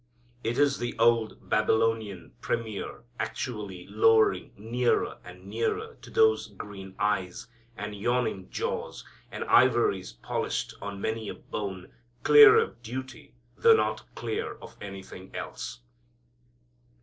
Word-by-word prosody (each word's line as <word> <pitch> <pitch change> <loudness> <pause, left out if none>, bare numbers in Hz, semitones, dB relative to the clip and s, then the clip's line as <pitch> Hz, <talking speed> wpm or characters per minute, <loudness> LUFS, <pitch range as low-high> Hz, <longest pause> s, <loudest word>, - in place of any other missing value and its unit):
It 115 +2 -1
is 145 -1 +3
the 120 0 -3
old 115 -1 +2
Babylonian 110 -3 +1
premier 110 -3 -3 0.2
actually 100 -7 -4
lowering 110 -2 +3
nearer 120 +4 0
and 90 +1 -12
nearer 115 - -2
to - - -12
those 445 -1 +3
green 95 -2 -10
eyes, 95 -3 -1 0.3
and 105 0 -5
yawning 110 -2 -1
jaws, - - -4 0.3
and - - -4
ivories 120 -7 +3
polished - - -3
on 100 -1 -5
many 110 0 -2
a - - -5
bone, 95 -3 -6 0.3
clear 440 0 +9
of 455 - 0
duty 125 +2 -7 0.2
though 460 -1 +6
not - - 0
clear 440 +1 -3
of - - -13
anything 95 -1 -9
else. - - -6
110 Hz, 120 wpm, -28 LUFS, 100-125 Hz, 0.3 s, clear